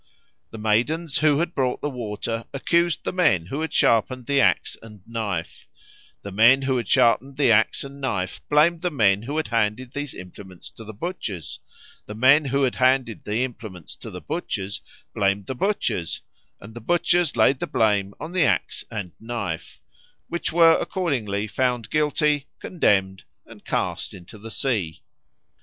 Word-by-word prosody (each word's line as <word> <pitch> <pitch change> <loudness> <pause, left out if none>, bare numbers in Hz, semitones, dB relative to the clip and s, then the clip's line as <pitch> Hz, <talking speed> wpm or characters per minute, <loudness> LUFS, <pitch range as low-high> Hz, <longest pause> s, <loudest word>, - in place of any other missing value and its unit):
The 115 - -9
maidens 125 +9 0
who 155 -2 +4
had 170 +2 -1
brought 130 -3 0
the - - -1
water 115 -1 -4
accused 170 +4 +1
the - - -3
men 95 - +3
who 140 - -4
had 160 - -3
sharpened 120 +2 +2
the 140 +1 +2
axe - - +2
and 105 -4 -14
knife; 105 -7 -4 0.6
the 100 - -6
men 115 +7 +5
who 130 -1 +1
had 120 - -3
sharpened 130 +3 +3
the 140 -5 +4
axe 110 0 +3
and 140 0 -10
knife 100 -9 -2
blamed 160 +3 +4
the 180 - 0
men 105 - +3
who 140 +7 -4
had 155 - -1
handed 115 +2 -1
these 145 -1 -5
implements 90 0 -11
to 115 - -11
the 110 - -8
butchers; 105 - -5 0.5
the 105 - -7
men 135 +7 +5
who 140 +1 +1
had 130 - +2
handed 130 -3 +1
the 110 +4 0
implements 110 -9 -7
to - - -9
the - - -8
butchers 95 +2 -4 0.3
blamed 100 0 0
the 130 - -4
butchers; 130 - -1 0.4
and 105 +3 -12
the 120 - -9
butchers 175 +3 +2
laid 130 +4 +4
the - - -3
blame 100 -3 +1
on 160 - -6
the 180 -2 +2
axe 145 - 0
and 105 -6 -5
knife, 110 -8 -5 0.5
which 170 0 -2
were 165 -1 +6
accordingly 115 - -1
found 125 0 -1
guilty, 150 -1 +1
condemned, 95 - +1 0.2
and - - -15
cast - - -2
into 95 +4 -12
the 110 +2 -9
sea. 100 - -2
120 Hz, 170 wpm, -24 LUFS, 105-145 Hz, 0.6 s, were